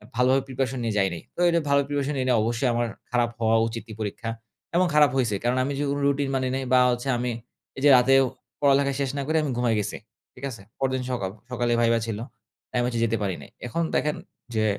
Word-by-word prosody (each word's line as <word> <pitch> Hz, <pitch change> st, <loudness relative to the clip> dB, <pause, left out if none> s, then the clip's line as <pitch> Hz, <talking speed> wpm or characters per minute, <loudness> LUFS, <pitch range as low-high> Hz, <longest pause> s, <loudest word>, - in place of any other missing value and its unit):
ভালোভাবে 130 Hz, +2 st, +3 dB
প্রিপারেশন 130 Hz, 0 st, -2 dB
নিয়ে 115 Hz, -2 st, -1 dB
যাইনি। 95 Hz, -4 st, +1 dB, 0.2 s
তো -, -, -10 dB
এ -, -, +5 dB, 0.2 s
ভালো 140 Hz, 0 st, +4 dB
প্রিপারেশন 145 Hz, 0 st, -1 dB
নেই 130 Hz, -, 0 dB
নাই 125 Hz, -, +4 dB
অবশ্যই 120 Hz, +4 st, 0 dB
আমার 120 Hz, 0 st, 0 dB, 0.2 s
খারাপ 120 Hz, -1 st, +2 dB
হওয়া 115 Hz, 0 st, +3 dB
উচিতই 115 Hz, -1 st, -7 dB
পরীক্ষা 110 Hz, +2 st, -4 dB, 0.5 s
এবং 180 Hz, +1 st, +4 dB
খারাপ 150 Hz, -3 st, +6 dB
হইছে। 115 Hz, -6 st, +1 dB
কারণ 120 Hz, +2 st, +1 dB
আমি 140 Hz, +2 st, -2 dB
যে -, -, 0 dB
কোন 145 Hz, +1 st, -1 dB
রুটিন 140 Hz, 0 st, +1 dB
মানি 130 Hz, -1 st, 0 dB
নাই 135 Hz, -, -2 dB
বা 130 Hz, -, +7 dB
হচ্ছে 120 Hz, +2 st, -3 dB
আমি 125 Hz, +1 st, -1 dB, 0.5 s
এই -, -, -5 dB
যে -, -, +8 dB
রাতেও 135 Hz, +2 st, +5 dB, 0.4 s
পড়ালেখা 140 Hz, 0 st, +4 dB
শেষ 140 Hz, -, 0 dB
না -, -, 0 dB
করে 160 Hz, +1 st, +2 dB
আমি 145 Hz, -, -1 dB
ঘুমায় 120 Hz, -2 st, +2 dB
গেছি। 105 Hz, 0 st, -3 dB, 0.4 s
ঠিক 130 Hz, -, -15 dB
আছে? 115 Hz, -5 st, -9 dB, 0.2 s
পরদিন 130 Hz, -1 st, 0 dB
সকাল 100 Hz, -7 st, -2 dB, 0.2 s
সকালেই 120 Hz, -1 st, +1 dB
ভাইভা 115 Hz, 0 st, +3 dB
ছিল। 110 Hz, -2 st, -3 dB, 0.5 s
তা -, -, -61 dB
আমি 120 Hz, -, +2 dB
হচ্ছে 120 Hz, -2 st, -1 dB
যেতে 115 Hz, 0 st, 0 dB
পারি 95 Hz, -3 st, -1 dB
নাই। -, -, -12 dB, 0.2 s
এখন 165 Hz, +8 st, -2 dB
দেখেন 150 Hz, 0 st, +1 dB, 0.4 s
যে, 110 Hz, 0 st, +2 dB
125 Hz, 225 wpm, -25 LUFS, 115-135 Hz, 0.5 s, যে